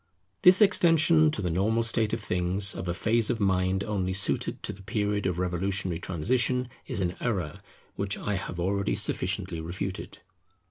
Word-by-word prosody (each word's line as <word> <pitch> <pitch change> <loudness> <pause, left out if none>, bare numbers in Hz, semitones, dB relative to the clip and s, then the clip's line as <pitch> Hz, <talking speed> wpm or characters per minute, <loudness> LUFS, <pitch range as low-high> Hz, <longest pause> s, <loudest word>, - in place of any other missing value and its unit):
This 185 +4 +7
extension 165 -5 +5
to 110 -9 -4
the 90 - -1
normal 110 +7 +1
state 110 -1 +1
of 115 - -2
things 90 +1 +1
of 90 - -6
a 85 - -1
phase 115 +3 +1
of 120 -3 -1
mind 95 -1 +1
only 95 -3 -2
suited 95 +1 -1
to - - -3
the 95 - -14
period 105 -1 -1
of 90 -2 -2
revolutionary 90 0 -1
transition, 125 +8 0 0.2
is 115 -7 -3
an 90 -1 -1
error 90 -11 -3 0.4
which 100 -1 -2
I 105 - -3
have 90 -2 -5
already 100 +3 0
sufficiently 80 - -1
refuted. 95 +3 -6
100 Hz, 170 wpm, -27 LUFS, 90-115 Hz, 0.4 s, This